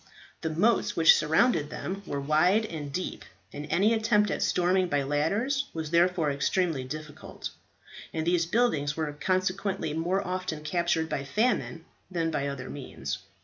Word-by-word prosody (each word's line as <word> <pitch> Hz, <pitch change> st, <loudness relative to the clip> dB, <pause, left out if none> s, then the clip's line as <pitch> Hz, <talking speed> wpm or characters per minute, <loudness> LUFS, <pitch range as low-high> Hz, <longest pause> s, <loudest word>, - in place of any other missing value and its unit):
The 160 Hz, -, -1 dB
moats 200 Hz, +9 st, +2 dB
which 165 Hz, -1 st, +7 dB
surrounded 160 Hz, 0 st, +2 dB
them 195 Hz, +5 st, -5 dB
were 140 Hz, -, -2 dB
wide 165 Hz, +9 st, +3 dB
and 150 Hz, -7 st, -6 dB
deep, 185 Hz, +6 st, -4 dB, 0.3 s
and 145 Hz, +1 st, -6 dB
any 205 Hz, +8 st, +3 dB
attempt 220 Hz, -2 st, +2 dB
at -, -, -2 dB
storming 180 Hz, +1 st, +2 dB
by 145 Hz, -4 st, 0 dB
ladders 205 Hz, -, 0 dB
was 160 Hz, -1 st, -4 dB
therefore 170 Hz, -3 st, +3 dB
extremely 150 Hz, +1 st, 0 dB
difficult; 155 Hz, +3 st, -7 dB, 0.6 s
and 160 Hz, 0 st, -2 dB
these 170 Hz, -1 st, +2 dB
buildings 165 Hz, -10 st, +1 dB
were 155 Hz, -2 st, -2 dB
consequently 185 Hz, 0 st, -1 dB
more 180 Hz, +5 st, 0 dB
often 180 Hz, -4 st, -3 dB
captured 170 Hz, 0 st, 0 dB
by 140 Hz, -, -3 dB
famine 190 Hz, -, 0 dB, 0.2 s
than 165 Hz, -3 st, -1 dB
by 140 Hz, -2 st, -1 dB
other 140 Hz, -2 st, -5 dB
means. 85 Hz, -, -5 dB
165 Hz, 150 wpm, -28 LUFS, 150-185 Hz, 0.6 s, which